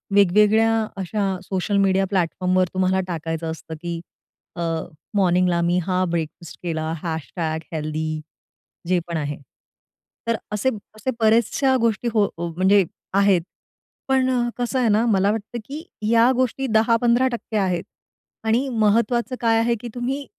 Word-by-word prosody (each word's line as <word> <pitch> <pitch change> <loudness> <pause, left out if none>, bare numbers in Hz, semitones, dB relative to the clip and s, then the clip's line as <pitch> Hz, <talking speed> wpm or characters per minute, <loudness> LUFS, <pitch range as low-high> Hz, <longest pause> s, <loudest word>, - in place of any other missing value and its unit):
वेगवेगळ्या 210 +3 +5 0.3
अशा 195 +2 -2 0.2
social 190 +2 -1
media 195 0 +3
प्लॅटफॉर्मवर 185 0 +1
तुम्हाला 185 0 +2
टाकायचं 165 -1 -3
असतं 160 0 -8
की 170 -1 -4 0.6
अ, 175 - -5 0.5
मॉर्निंग 180 -2 +3
ला 170 -1 +1
मी 175 +1 +2
हा 185 -1 +1
ब्रेकफास्ट 165 0 -4
केला, 160 -2 -2
हॅशटॅग 160 -1 -3
हेल्थी 155 0 -2 0.7
जे 180 0 +3
पण 170 -1 -2
आहे. 145 -1 -3 0.9
तर 230 - +2 0.2
असे 210 +5 +1 0.3
असे 215 +5 -2
बऱ्याचशा 230 +4 +3
गोष्टी 230 0 +1
हो 215 -2 +4
हो 170 +1 -3
म्हणजे 190 +2 +4 0.3
आहेत, 200 -2 +4 0.7
पण 265 -1 +2 0.3
कसं 245 +2 -1
आहे 240 -3 +2
ना, 215 +2 +3
मला 200 -3 +3
वाटतं 225 +2 -4
की 295 +6 -7 0.3
या 235 +2 +5
गोष्टी 255 +1 0
10%-15% 235 +1 +2
आहेत 185 -4 0 0.6
आणि 230 +5 +1
महत्त्वाचं 235 +2 +1
काय 225 -1 +3
आहे 235 +1 +2
की 245 - -6
तुम्ही 265 +4 -2
200 Hz, 140 wpm, -22 LUFS, 175-230 Hz, 0.9 s, वेगवेगळ्या